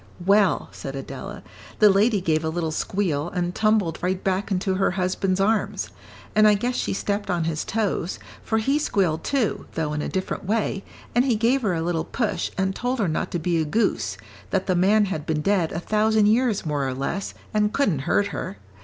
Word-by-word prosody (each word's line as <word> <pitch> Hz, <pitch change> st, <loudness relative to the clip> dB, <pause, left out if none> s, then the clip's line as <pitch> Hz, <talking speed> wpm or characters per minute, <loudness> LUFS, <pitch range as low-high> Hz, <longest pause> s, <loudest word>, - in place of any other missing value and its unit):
"Well," 200 Hz, +1 st, +3 dB
said -, -, -7 dB
Adela, -, -, -7 dB, 0.3 s
"the 210 Hz, -2 st, +7 dB
lady 205 Hz, +1 st, +3 dB
gave 160 Hz, -2 st, +1 dB
a 160 Hz, -, 0 dB
little 160 Hz, -1 st, -2 dB
squeal, 165 Hz, -3 st, -1 dB
and 175 Hz, 0 st, -1 dB
tumbled 215 Hz, -6 st, +1 dB
right 185 Hz, +1 st, -1 dB
back 190 Hz, +1 st, 0 dB
into 190 Hz, 0 st, 0 dB
her 195 Hz, +1 st, +2 dB
husband's 185 Hz, +1 st, 0 dB
arms. 215 Hz, +3 st, +1 dB, 0.5 s
And 215 Hz, 0 st, +6 dB
I 210 Hz, -, +6 dB
guess 245 Hz, +5 st, -1 dB
she -, -, -1 dB
stepped 205 Hz, +1 st, -2 dB
on 175 Hz, -3 st, +1 dB
his 160 Hz, -1 st, -1 dB
toes, 205 Hz, -5 st, -1 dB, 0.3 s
for 220 Hz, -, 0 dB
he 275 Hz, +7 st, +2 dB
squealed, 180 Hz, -, 0 dB
too, 265 Hz, -7 st, -1 dB
though 155 Hz, -2 st, -1 dB
in 150 Hz, -, -2 dB
a -, -, -3 dB
different 190 Hz, 0 st, -3 dB
way, 200 Hz, -1 st, -1 dB, 0.3 s
and 245 Hz, -, +4 dB
he 250 Hz, -4 st, +2 dB
gave 240 Hz, +5 st, +2 dB
her 200 Hz, -6 st, 0 dB
a 165 Hz, -, -1 dB
little 165 Hz, -1 st, 0 dB
push 230 Hz, -5 st, -1 dB
and 190 Hz, 0 st, 0 dB
told 250 Hz, +2 st, -1 dB
her 210 Hz, -6 st, +1 dB
not 155 Hz, -, -1 dB
to -, -, -2 dB
be 170 Hz, 0 st, 0 dB
a -, -, +2 dB
goose, 150 Hz, -, 0 dB, 0.3 s
that 190 Hz, -1 st, 0 dB
the 185 Hz, -, +1 dB
man 205 Hz, +4 st, +4 dB
had 160 Hz, -6 st, -4 dB
been 155 Hz, -1 st, 0 dB
dead 190 Hz, -4 st, +2 dB
a 165 Hz, -, -3 dB
thousand 215 Hz, +3 st, +2 dB
years 220 Hz, -1 st, +2 dB
more 145 Hz, -3 st, -1 dB
or 130 Hz, -, -3 dB
less 140 Hz, +9 st, -3 dB, 0.2 s
and 210 Hz, -1 st, +2 dB
couldn't 210 Hz, -, +1 dB
hurt 205 Hz, 0 st, +2 dB
her. 100 Hz, -, -5 dB
195 Hz, 205 wpm, -24 LUFS, 165-215 Hz, 0.5 s, the